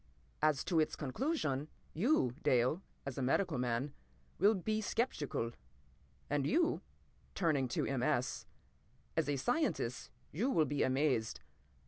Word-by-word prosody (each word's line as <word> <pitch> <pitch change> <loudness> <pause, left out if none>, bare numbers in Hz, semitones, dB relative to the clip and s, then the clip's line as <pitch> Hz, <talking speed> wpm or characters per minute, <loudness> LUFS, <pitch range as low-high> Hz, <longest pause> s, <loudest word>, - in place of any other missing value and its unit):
"As 150 -2 +3
to 170 -3 +2
its 155 0 +1
conclusion, 150 - -1 0.3
you, 175 - +2
Dale, 130 +8 +3 0.2
as 135 -1 -4
a - - -1
medical 145 +3 +1
man, 125 +3 -1 0.5
will 205 +4 +5
be 215 +3 -1
sceptical. 155 - -1 0.8
And 145 -1 0
you"—turning 175 - -1
to 120 - -1
M. 135 -3 -1
S.—"as 130 0 -3
a 145 - +2
scientist 240 - 0 0.2
you 220 - 0
will 160 - +3
be 145 -1 -1
amazed. 130 -4 +1
145 Hz, 120 wpm, -35 LUFS, 130-195 Hz, 0.8 s, will